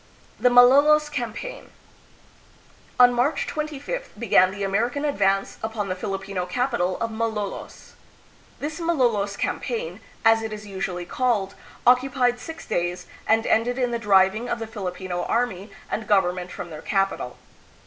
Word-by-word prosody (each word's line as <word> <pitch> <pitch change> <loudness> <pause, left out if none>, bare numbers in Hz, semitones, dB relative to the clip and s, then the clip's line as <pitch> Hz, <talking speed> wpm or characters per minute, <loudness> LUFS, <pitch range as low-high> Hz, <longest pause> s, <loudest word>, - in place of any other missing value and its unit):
The 250 - +4
Malolos 285 +5 +6
Campaign. 290 - -5 1.3
On 245 0 +8
March 270 +5 +1
25th 305 - -4
began 205 -4 +4
the 200 +1 -5
American 235 +9 0
advance 195 -8 +1
upon 220 -3 -3
the 185 - -1
Filipino 195 -1 -4
capital 235 -8 0
of 230 0 -2
Malolos. 220 -3 -4 0.7
This 305 +3 -4
Malolos 240 -12 +1
campaign, 480 +1 -3 0.3
as 225 0 +6
it 220 0 -4
is 210 0 -7
usually 190 -3 -4
called, 210 -3 0 0.3
occupied 250 0 +3
six 325 +6 -8
days, 175 +1 -2 0.2
and 225 +1 +3
ended 245 +3 +2
in 250 -2 0
the 235 - -1
driving 205 +2 +3
of - - -1
the 225 - -5
Filipino 185 -4 -4
army 225 -4 -1 0.2
and 215 -1 -3
government 180 -3 +1
from 175 - -7
their 155 - -8
capital. 195 -10 -1
225 Hz, 140 wpm, -24 LUFS, 195-250 Hz, 1.3 s, On